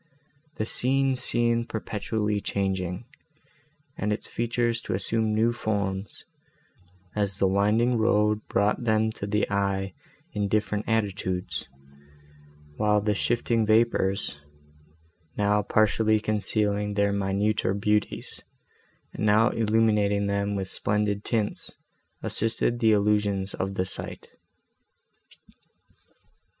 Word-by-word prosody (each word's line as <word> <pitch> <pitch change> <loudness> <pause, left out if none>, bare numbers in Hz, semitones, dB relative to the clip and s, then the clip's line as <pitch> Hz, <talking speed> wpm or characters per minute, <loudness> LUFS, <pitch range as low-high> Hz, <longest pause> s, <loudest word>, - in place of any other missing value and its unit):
The 110 - -2
scene 135 +3 +2
seemed 120 -2 +1
perpetually 105 -1 -2
changing, 95 0 -2 0.9
and 105 - 0
its 105 - -3
features 120 0 -1
to - - -3
assume 110 +2 0
new 115 +2 +3
forms, 100 -4 -3 0.9
as 100 -2 -1
the 100 - +2
winding 105 +5 +2
road 105 -1 +2
brought 105 +4 +1
them 110 -1 +2
to 100 - -6
the 105 0 +1
eye 100 -1 -1 0.4
in 105 -1 -1
different 105 0 0
attitudes; 100 -4 -2 1.1
while 105 0 +3
the 105 +1 0
shifting 115 +2 +1
vapours, 105 -8 +1 1.0
now 105 0 +2
partially 110 +1 +2
concealing 105 -1 0
their 100 0 +2
minuter 100 0 0
beauties 105 +1 -1 0.7
and - - -5
now 110 +2 +4
illuminating 105 -2 +2
them 100 0 -1
with 95 -1 -2
splendid 105 +1 0
tints, 110 -3 -2 0.5
assisted 115 +2 +1
the 110 -2 +4
illusions 100 -2 +1
of 95 +1 -3
the 95 - 0
sight. 95 - -4
105 Hz, 105 wpm, -26 LUFS, 100-110 Hz, 1.1 s, now